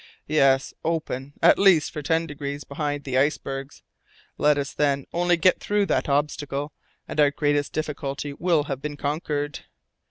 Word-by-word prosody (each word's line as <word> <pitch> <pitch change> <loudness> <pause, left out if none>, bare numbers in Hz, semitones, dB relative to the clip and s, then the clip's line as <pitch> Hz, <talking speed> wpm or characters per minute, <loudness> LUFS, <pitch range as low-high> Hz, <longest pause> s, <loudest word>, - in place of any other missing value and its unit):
"Yes, 135 -3 +3
open 145 -4 -3
at 170 - +6
least, 190 -6 +5
for 150 - -5
ten 160 +3 +1
degrees 145 -1 -5
behind 145 0 -3
the 130 -1 0
icebergs. 135 -1 -2 0.6
Let 150 0 +4
us 140 -1 -3
then 140 -2 +1
only 175 0 +2
get 185 +2 +3
through 205 0 +1
that 180 - 0
obstacle, 145 0 -1 0.3
and - - -5
our 145 -1 +6
greatest 145 0 0
difficulty 145 -2 -4
will 170 -1 +1
have 135 -2 -5
been 145 0 -5
conquered. 145 -1 -2
145 Hz, 155 wpm, -24 LUFS, 140-155 Hz, 0.6 s, at